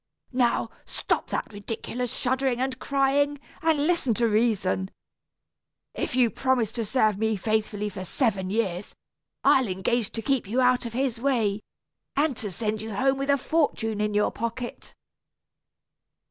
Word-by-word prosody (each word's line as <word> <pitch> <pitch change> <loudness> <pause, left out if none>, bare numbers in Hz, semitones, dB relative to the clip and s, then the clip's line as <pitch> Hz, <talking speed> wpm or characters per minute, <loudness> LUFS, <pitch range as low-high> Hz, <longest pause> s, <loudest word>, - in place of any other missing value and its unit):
Now, 240 -2 +2 0.2
stop - - -1
that - - -3
ridiculous 230 +4 -4
shuddering 260 -1 0
and 260 0 -1
crying, 280 +1 +1 0.2
and 315 -3 +2
listen 315 -9 +2
to 235 +1 +2
reason. 210 -4 +1 1.0
If - - -3
you 245 -3 +4
promise 255 -5 +1
to 230 -1 -2
serve 215 -3 +2
me 220 0 +1
faithfully 210 +1 -1
for 190 -2 -6
seven 190 -2 0
years, 200 -3 -2 0.5
I'll 260 -3 +5
engage 195 +4 0
to 225 - -4
keep 270 -3 +1
you 235 +6 0
out 250 -1 +3
of 230 - -8
his 250 -2 -1
way, 225 -7 +1 0.5
and 290 -1 +2
to 210 - -2
send 215 +2 -2
you 220 -2 -5
home 270 +4 +2
with 275 +1 -2
a 280 - +5
fortune 245 -8 0
in 210 -1 0
your 210 - +3
pocket." 235 +2 -5
235 Hz, 150 wpm, -26 LUFS, 210-260 Hz, 1.0 s, I'll